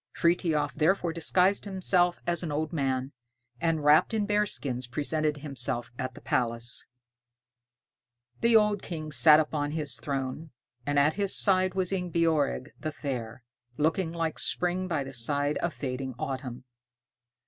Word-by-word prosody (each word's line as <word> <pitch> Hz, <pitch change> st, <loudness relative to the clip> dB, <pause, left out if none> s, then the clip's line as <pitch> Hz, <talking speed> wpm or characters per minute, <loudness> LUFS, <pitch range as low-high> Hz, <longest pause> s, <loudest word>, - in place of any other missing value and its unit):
Frithiof. 165 Hz, -4 st, +1 dB
therefore 170 Hz, +1 st, +1 dB
disguised 180 Hz, +4 st, +2 dB
himself 185 Hz, -2 st, +1 dB
as 170 Hz, 0 st, 0 dB
an 165 Hz, -4 st, -4 dB
old 155 Hz, +2 st, -2 dB
man, 135 Hz, -3 st, -1 dB, 0.5 s
and 165 Hz, -2 st, 0 dB
wrapped 150 Hz, +9 st, +4 dB
in 210 Hz, -2 st, 0 dB
bearskins, 170 Hz, -, -1 dB
presented 150 Hz, +3 st, -1 dB
himself 135 Hz, -4 st, -3 dB
at 130 Hz, -, -4 dB
the -, -, -12 dB
palace. 115 Hz, -1 st, +1 dB, 1.5 s
The 235 Hz, 0 st, +3 dB
old 210 Hz, -2 st, +4 dB
King 155 Hz, -3 st, -6 dB
sat 150 Hz, +3 st, +6 dB
upon 150 Hz, -1 st, -1 dB
his 155 Hz, -3 st, -1 dB
throne, 140 Hz, +2 st, -4 dB, 0.4 s
and 145 Hz, 0 st, 0 dB
at 145 Hz, +2 st, +4 dB
his 200 Hz, -1 st, +2 dB
side 185 Hz, -1 st, +3 dB
was 185 Hz, -1 st, 0 dB
Ingebjorg 165 Hz, -5 st, 0 dB
the 155 Hz, -, -4 dB
Fair, 125 Hz, -5 st, -5 dB, 0.3 s
looking 160 Hz, +3 st, 0 dB
like 165 Hz, -2 st, -2 dB
spring 180 Hz, +1 st, 0 dB
by 160 Hz, -6 st, -1 dB
the 135 Hz, 0 st, -9 dB
side 145 Hz, +4 st, 0 dB
of 170 Hz, -, -1 dB
fading 130 Hz, -3 st, -5 dB
autumn. 130 Hz, -1 st, -5 dB
155 Hz, 140 wpm, -28 LUFS, 135-175 Hz, 1.5 s, sat